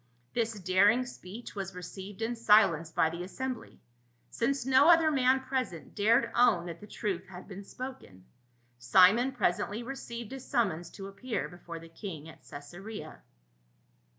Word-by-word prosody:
This 225 -3 -1
daring 200 +7 +4
speech 230 -1 -9
was 195 -2 -5
received 190 +4 -7
in 235 +2 -1
silence 210 -8 +4
by 160 0 +2
the 170 +1 -6
assembly, 255 +8 -5 0.5
since 265 +1 0
no 265 +4 +6
other 330 -2 +6
man 260 -1 +3
present 260 - -3
dared 230 +2 +3
own 235 -8 +4
that 170 -1 -7
the 210 - -12
truth 195 -4 -3
had 180 -1 -11
been 195 0 -8
spoken. 200 - -9 0.5
Simon 190 - +5
presently 210 -1 -1
received 235 -3 -7
a 270 - -5
summons 200 - -1
to 195 - -8
appear 195 +5 -4
before 175 -1 -9
the 165 0 -11
king 165 -3 -8
at 160 - -14
Caesarea. 175 +10 -9
205 Hz, 150 wpm, -30 LUFS, 180-245 Hz, 0.5 s, no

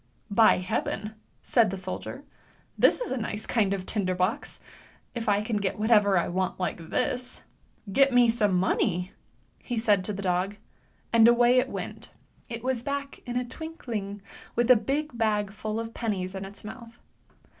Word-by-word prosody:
" - - -38
" - - -22
By 215 - +6
heaven! 200 +3 -2
" - - -40
said 230 -3 +3
the 195 - -4
soldier, 185 0 -5 0.3
" - - -34
this - - +5
is - - -4
a 260 - -1
nice 210 -2 -3
kind 210 -5 +1
of 195 -2 -2
tinder 185 -4 -1
box, 180 +1 -2 0.5
if 230 -3 -2
I 205 0 +2
can 220 0 -1
get 200 -2 -1
whatever 210 -3 +4
I 170 - +1
want 185 +1 -2
like 170 -3 -3
this! 250 0 -1 0.5
Get 275 +6 +5
me 245 -1 +6
some 215 -4 +2
money," 180 0 +1 0.5
he 245 - -4
said 210 -4 +3
to - - -2
the 200 0 -5
dog, 185 +2 0 0.6
and 230 -1 +7
away 240 +1 +5
it - - 0
went. - - -6 0.4
It 230 -1 -6
was 255 -2 0
back 280 +1 -4
in 245 0 -2
a 250 - -1
twinkling 235 -9 -6 0.3
with 240 +1 +3
a - - +9
big 275 +5 -1
bag 210 -3 0
full 215 +2 -4
of 230 0 -5
pennies 195 -5 -2
in 190 0 -5
its 200 +1 -12
mouth. 230 +2 -10
215 Hz, 185 wpm, -27 LUFS, 195-240 Hz, 0.6 s, a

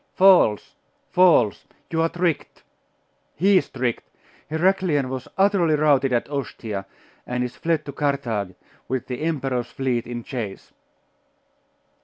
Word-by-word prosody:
'False! 185 - +5 0.4
false! 170 - +4 0.2
you 160 -1 +1
are 165 - +2
tricked! 175 -3 -2 0.7
He 195 +3 +4
is - - -7
tricked! 125 -3 -3 0.4
Heraclian 160 -4 +1
was 130 0 -5
utterly 190 -5 +3
routed 145 -3 +3
at 120 -1 0
Ostia, 115 -8 -5 0.4
and 125 0 -1
is 125 -1 -5
fled 165 -1 -1
to 140 - -5
Carthage, 125 -10 -2 0.3
with 130 -1 -2
the 125 +1 -5
emperor's 135 -6 -1
fleet 125 -3 -2
in 120 -1 -5
chase. 110 -7 -6
135 Hz, 125 wpm, -23 LUFS, 120-165 Hz, 0.7 s, False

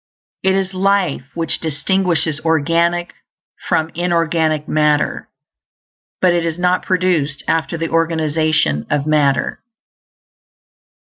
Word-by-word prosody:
It 190 0 +2
is 195 0 -1
life 190 -7 +1
which 165 -1 0
distinguishes 165 -1 0
organic 165 +2 +1 0.6
from 160 0 +1
inorganic 165 -3 0
matter, 150 -1 +1 0.9
but 180 -2 +3
it 170 -1 +1
is 165 -1 -2
not 180 0 +1
produced 180 -7 0
after 165 +1 0
the 165 0 -3
organization 155 - +1
of 145 -1 0
matter. 145 -4 +1
165 Hz, 105 wpm, -18 LUFS, 155-175 Hz, 0.9 s, but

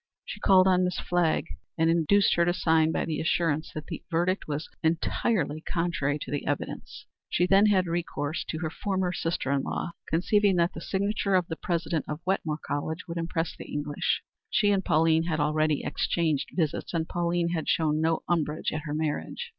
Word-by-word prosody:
She - - -7
called 190 -2 +5
on 185 -1 +4
Miss 180 -1 -1
Flagg 175 -3 +1 0.3
and 165 0 +3
induced 170 +4 +4
her 170 - +3
to 175 +1 +1
sign 160 -2 +3
by - - -1
the 160 -2 -2
assurance 160 -2 0
that 155 - -5
the - - -6
verdict 180 +3 0
was 150 +1 -3
entirely 160 -1 0
contrary 165 -5 -1
to - - -8
the 145 - -3
evidence. 145 0 -4 0.2
She 175 - +2
then 195 +3 +5
had 190 -3 +3
recourse 165 -3 -2
to 160 - -4
her 160 -2 -2
former 190 -1 -1
sister 165 -5 -2
in 140 -1 +2
law, 170 - -3 0.2
conceiving 200 +4 +3
that 170 0 +2
the 160 - -7
signature 200 +1 0
of 180 -1 +3
the 160 - -2
President 170 -1 -2
of 150 0 -4
Wetmore 165 -5 -1
College 155 +5 -3
would 170 0 -5
impress 165 -1 -2
the - - -10
English. 145 0 -1 0.3
She 205 -3 +3
and 195 -1 +1
Pauline 160 0 +3
had 160 -2 -1
already 155 0 +1
exchanged 155 0 0
visits, 165 0 -1
and 160 -1 0
Pauline 170 0 0
had 165 -2 -2
shown 155 -1 +2
no 160 0 +1
umbrage 155 -3 0
at 155 0 -4
her 150 -1 -3
marriage. 155 - -3
165 Hz, 190 wpm, -27 LUFS, 155-180 Hz, 0.3 s, called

